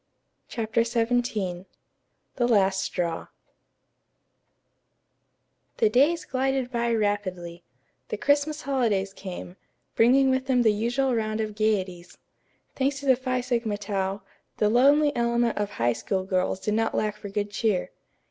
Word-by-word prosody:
CHAPTER 225 0 0
XVII 230 -6 -1 0.7
THE 240 -2 +2
LAST 195 -4 +3
STRAW 170 -4 -3 2.5
The 445 - +3
days 320 +6 +3
glided 265 -1 -1
by 235 -1 0
rapidly. 185 -5 -2 0.5
The - - -3
Christmas 290 +4 +1
holidays 220 -8 0
came, 185 -1 -8 0.4
bringing 265 +3 +5
with 260 0 -1
them 250 -2 +3
the 220 -2 +4
usual 245 +5 0
round 215 -1 -1
of 215 -1 -2
gayeties. 190 -5 -2 0.6
Thanks 275 +1 0
to - - -8
the 260 -2 +5
Phi 255 0 -2
Sigma 235 -4 -1
Tau, 195 -1 -3 0.3
the 210 - +2
lonely 285 +5 +4
element 235 -1 +1
of 205 -1 -1
High 120 +1 +1
School 190 - -2
girls 185 0 -1
did 210 - -2
not 225 +1 0
lack 210 -1 0
for 210 -1 -9
good 205 0 -3
cheer. 210 -3 0
225 Hz, 135 wpm, -26 LUFS, 200-255 Hz, 2.5 s, bringing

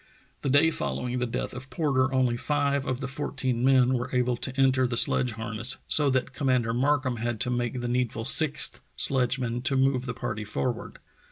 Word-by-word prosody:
The 140 - -2
day 145 +4 +4
following 125 -5 -3
the 125 - -1
death 115 - -4
of 130 +1 -8
Porter 135 -5 0
only 130 -2 +1
five 140 +1 -1
of 130 +1 -2
the 135 - -3
fourteen 130 -3 -2
men 130 -1 +4
were 125 0 -2
able 125 0 +1
to 130 +3 -4
enter 130 -1 +3
the 120 -1 -3
sledge 125 0 +2
harness, 115 +2 0
so 145 -2 +5
that 130 0 -1
Commander 125 -4 0
Markham 130 0 0
had 115 -1 -3
to 125 - 0
make 120 0 -2
the 120 - -3
needful 120 -2 -2
sixth 150 +2 +1 0.2
sledgeman 125 -2 +2
to 130 +2 -1
move 130 -1 +1
the 125 - -4
party 105 - -4
forward. 115 +3 -4
125 Hz, 190 wpm, -26 LUFS, 120-135 Hz, 0.2 s, so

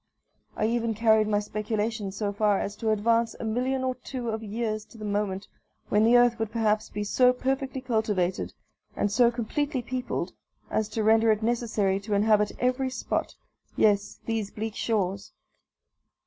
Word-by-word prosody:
I 215 - +1
even 230 0 0
carried 220 -1 +4
my 210 -1 +2
speculations 210 0 -2
so 205 -2 -1
far 205 -1 +2
as 205 - -3
to 225 - -1
advance 230 +2 +2
a - - -5
million 250 +4 0
or 260 0 0
two 250 -1 -6
of 220 0 -2
years 215 0 -3
to 230 - -16
the 215 - -7
moment 205 -1 -2 0.4
when 210 +1 +3
the 235 +2 +6
earth 240 -1 +4
would 225 -1 -1
perhaps 215 -2 +1
be 210 - -3
so 250 +4 +4
perfectly 265 +1 -2
cultivated, 215 -7 -1 0.4
and 205 - 0
so 235 +3 +5
completely 255 +3 -2
peopled, 250 +1 -3 0.4
as 215 -1 0
to 220 0 -2
render 225 +1 +5
it 215 0 0
necessary 220 -4 +1
to 205 +1 -2
inhabit 210 0 +3
every 255 +1 +1
spot 255 - -3 0.4
yes, 205 -2 +2
these 225 -3 -2
bleak 220 +1 -5
shores. 200 -4 -2
220 Hz, 165 wpm, -27 LUFS, 210-240 Hz, 0.4 s, the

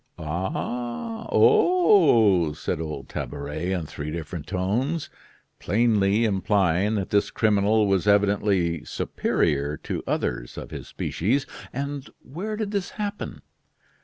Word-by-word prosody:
oh! 120 - -4
oh!" 160 - +5
said 75 - -3
old 75 -2 -5
Tabaret, 75 +5 -4
in 90 -4 -1
three 75 0 -6
different 80 0 -6
tones, 115 - -1 0.5
plainly 110 0 +2
implying 100 -1 +2
that 100 -3 -3
this 100 0 +2
criminal 105 0 +3
was 95 -1 +1
evidently 100 -5 +2
superior 75 0 -1
to - - -4
others - - -2
of - - -7
his - - -7
species. 125 - -1 0.3
"And 140 +1 -4
where 190 +11 -5
did 210 -1 -3
this 200 -3 -2
happen?" 205 -1 -4
100 Hz, 115 wpm, -25 LUFS, 85-135 Hz, 0.5 s, oh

